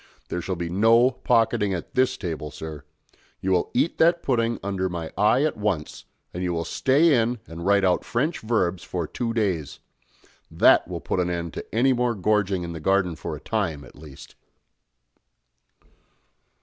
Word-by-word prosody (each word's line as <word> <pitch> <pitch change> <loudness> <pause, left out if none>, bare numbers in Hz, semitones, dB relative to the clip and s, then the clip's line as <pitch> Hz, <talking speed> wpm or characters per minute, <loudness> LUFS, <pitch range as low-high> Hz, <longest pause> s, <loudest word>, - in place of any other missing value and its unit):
There 90 - -3
shall 95 +2 -3
be 85 0 -4
no 115 +8 +4
pocketing 115 -6 +1
at 85 - -7
this 130 0 +2
table, 80 -5 -5
sir. 75 0 -8 0.6
You 95 - -2
will 90 -2 +1
eat 165 - +1
that 170 +1 +4
pudding 115 -3 0
under 95 -2 -2
my 85 -2 -5
eye 105 +8 +3
at 155 - 0
once, 100 -8 -3 0.3
and 90 - -5
you 90 -1 -1
will 85 -1 -2
stay 145 - +3
in 120 +2 -1
and 85 -1 -7
write 100 0 +4
out 90 -1 +2
French 145 +8 -1
verbs 95 -6 0
for 90 -2 -3
two 115 +9 -3
days. 95 -10 -2 0.7
That - - +4
will - - -5
put - - -2
an 90 -1 0
end 85 -2 -3
to - - -8
any 130 +3 +4
more 120 -1 0
gorging 100 -2 +1
in 85 0 -5
the 80 - -6
garden 90 0 +1
for - - -5
a - - -9
time, 75 -3 -2
at 65 - -15
least." 70 -1 -13
95 Hz, 175 wpm, -24 LUFS, 85-115 Hz, 0.7 s, no